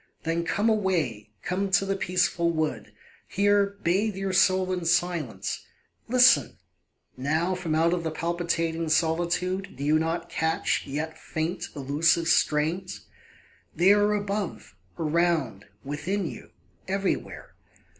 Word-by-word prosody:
Then 165 +1 -1
come 205 +5 0
away, 170 - 0
come 195 +2 -1
to 190 +1 +3
the 195 0 -1
peaceful 180 -2 +1
wood, 160 -2 -2 0.4
Here 200 0 +2
bathe 195 +4 +1
your 195 -1 -3
soul 185 0 +3
in 180 -1 -3
silence. 165 - -1 0.4
Listen! 250 +1 +5 0.6
Now, 155 +7 0
From 175 -4 -2
out 165 +1 +3
the 165 - -2
palpitating 165 0 -2
solitude 175 +4 0
Do 140 - -6
you 155 +2 +3
not 165 +2 -2
catch, 160 -2 -1
yet 150 +3 -4
faint, 160 +3 -3
elusive 150 +4 +1
strains? 160 +3 +1 0.7
They 180 +5 +5
are 210 0 +3
above, 200 - -4 0.2
around, 155 - 0 0.2
within 175 +8 -2
you, - - -8 0.4
everywhere. 195 0 -3
170 Hz, 120 wpm, -26 LUFS, 160-190 Hz, 0.7 s, Listen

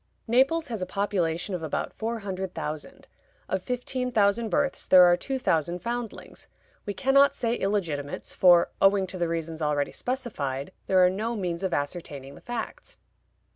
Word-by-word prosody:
Naples 270 +8 +3
has 225 -5 -4
a 185 - -2
population 185 -2 -1
of 180 - -3
about 160 -2 -3
four 230 +1 -3
hundred 190 -2 -5
thousand. 150 0 -6 0.4
Of 190 - -1
fifteen 250 +2 -3
thousand 215 +1 +2
births 285 +1 0
there 185 -1 +8
are 175 0 +6
two 270 +8 -3
thousand 170 - 0
foundlings; 235 -1 -5 0.4
we 205 - -1
can 270 0 +1
not 280 0 +6
say 235 -4 0
illegitimates, 170 -10 -2
for, 175 -2 +5
owing 195 0 +5
to 185 0 -7
the 170 - +1
reasons 165 -1 -4
already 150 -2 0
specified, 190 - -3 0.2
there 185 -1 +5
are - - +5
no 220 +5 -2
means 175 -5 -3
of 190 -2 -1
ascertaining 145 -2 -4
the - - -14
facts. 245 - -6
190 Hz, 170 wpm, -27 LUFS, 170-235 Hz, 0.4 s, there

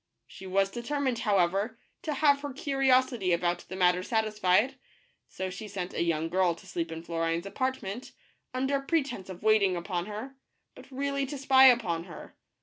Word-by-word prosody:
She 190 - -11
was 195 +1 +1
determined, 255 +1 -2
however, 200 +1 +1 0.2
to 305 -2 -3
have 285 0 +3
her 285 -2 -5
curiosity 260 -8 +2
about 175 +1 0
the 185 - -5
matter 180 -1 +3
satisfied, 215 +3 +1 0.5
so 190 0 -4
she 210 +4 -7
sent 185 -2 -5
a - - -2
young 165 -1 0
girl 180 0 +2
to 170 - -16
sleep 170 -3 -4
in 165 0 -6
Flo 170 -1 -4
rine's 165 +2 0
apartment, 240 +1 -3 0.4
under 265 +2 0
pretence 275 - -2
of 185 0 -9
waiting 215 -4 +4
upon 175 +1 -3
her, 215 +6 -6 0.4
but - - -14
really 275 +1 -2
to 285 +1 -5
spy 265 -1 +6
upon 180 -10 +2
her. 170 -5 -11
210 Hz, 170 wpm, -29 LUFS, 180-260 Hz, 0.5 s, spy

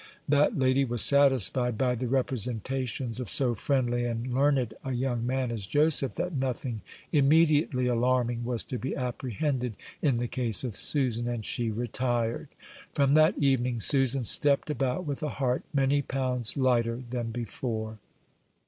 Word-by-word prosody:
That 145 +1 +2
lady 130 0 +2
was 120 -3 +2
satisfied 130 -4 +3
by 125 0 +1
the 125 +1 -3
representations 125 0 -2
of 125 -6 -3
so 125 +7 +2
friendly 120 0 0
and 120 +1 -3
learned 135 -4 +1
a 130 - -3
young 120 -1 -2
man 130 -1 -1
as 105 -5 -5
Joseph 145 -1 +2
that 180 - -3
nothing 130 -4 -3 0.3
immediately 150 -3 +3
alarming 120 0 0
was 120 -1 -1
to 125 - -5
be 135 - -4
apprehended 125 -1 -3 0.2
in 135 -6 +1
the 120 +1 -2
case 120 -3 0
of 120 -6 -4
Susan; 120 -4 +1
and 120 -3 -4
she 120 -2 -2
retired. 120 +1 -2 0.5
From 140 -1 +2
that 155 +3 +4
evening 125 -4 +1
Susan 135 +1 +2
stepped 140 +5 +3
about 135 +5 -2
with 145 0 -4
a 150 - -2
heart 130 -3 -1
many 140 0 +1
pounds 130 -3 -1
lighter 120 -3 +1
than 120 -1 -4
before. 110 -1 -5
125 Hz, 150 wpm, -27 LUFS, 120-135 Hz, 0.5 s, that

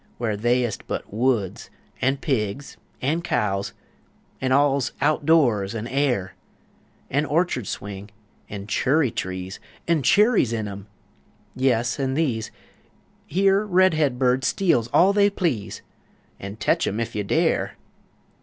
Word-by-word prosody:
where 115 -3 -1
They's 120 +3 +1
ist - - -8
but - - -5
woods 115 -4 -1 0.3
an' 135 +2 +2
pigs, 135 -2 -2 0.3
an' 155 +6 +1
cows 100 - -1 0.7
An' 130 0 0
all's 140 -2 +2
out 155 -1 +1
doors 120 -11 +3
an' 110 0 -4
air! 125 -9 0 0.8
An' 140 +3 +2
orchurd 145 - 0
swing; 100 0 -6 0.4
an' 100 -1 -6
churry 135 +5 +1
trees 95 0 -5 0.3
An' 165 -3 +2
churries 205 - +3
in 110 -2 -2
'em! 100 0 -8 0.7
Yes, 120 -2 +1
an' 135 -1 -1
these 125 -9 -1 0.8
Here 195 +2 +3
red 185 -3 +3
head 145 -5 +1
birds 130 0 +2
steals 165 - +1
all 185 +10 +4
they 205 0 +4
please, 165 - -3 0.6
An' 100 +1 -7
tetch 110 - +1
'em 105 - -2
ef 115 0 -3
you 105 - -2
dare! 100 - 0
125 Hz, 135 wpm, -23 LUFS, 105-155 Hz, 0.8 s, all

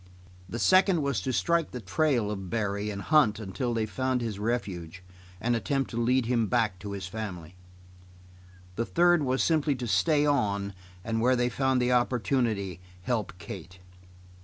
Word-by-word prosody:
The 115 - -4
second 185 +2 +4
was 140 -8 0
to 130 - -2
strike 170 +4 +1
the 125 - -6
trail 120 +1 +1
of 95 -3 -5
Barry 105 -1 -1
and 100 -1 -5
hunt 150 -9 +4
until 110 +4 -3
they 115 -2 0
found 130 +3 -1
his 110 -4 -4
refuge 95 -6 -3 0.4
and 120 +4 +1
attempt 135 +4 -1
to 120 0 -2
lead 125 +1 +2
him 115 -2 +1
back 100 -2 +1
to 100 +2 -6
his 95 -2 -5
family. 90 -4 -6 1.2
The 115 - 0
third 175 -1 +4
was 130 -1 +1
simply 155 -3 +2
to 125 -1 -5
stay 120 - +2
on 100 -8 0 0.3
and 115 +1 -1
where 130 +2 +4
they 120 0 +1
found 130 +1 +1
the 125 0 +1
opportunity, 115 - 0 0.2
help 110 -7 -1
Kate. 90 0 -9
115 Hz, 165 wpm, -28 LUFS, 100-130 Hz, 1.2 s, second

